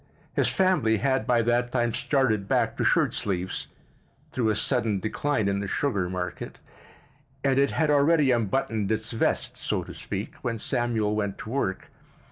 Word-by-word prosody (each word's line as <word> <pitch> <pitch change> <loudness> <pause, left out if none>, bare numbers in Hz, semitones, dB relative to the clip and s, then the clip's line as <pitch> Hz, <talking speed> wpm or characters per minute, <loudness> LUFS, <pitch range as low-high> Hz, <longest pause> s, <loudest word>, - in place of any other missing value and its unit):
His - - +2
family 185 -13 +2
had 130 +4 0
by 120 -2 +3
that 120 +1 +1
time 120 -2 0
started 115 -8 +1
back - - +1
to - - 0
shirt - - +3
sleeves, 95 -2 -2 0.6
through 115 -4 0
a 110 - +1
sudden 115 -3 +1
decline 110 +2 -1
in 100 0 0
the 100 - -3
sugar 100 -7 -1
market, 90 -1 -5 0.9
and 135 -1 +3
it 140 - +3
had 155 0 +1
already 145 -1 +4
unbuttoned 110 -2 0
its 110 0 -2
vest, 115 - 0
so - - -2
to - - -9
speak, - - -5
when 115 -1 -2
Samuel 110 -2 0
went 100 -2 -2
to 110 - -8
work. 120 -8 -2
115 Hz, 165 wpm, -26 LUFS, 105-135 Hz, 0.9 s, already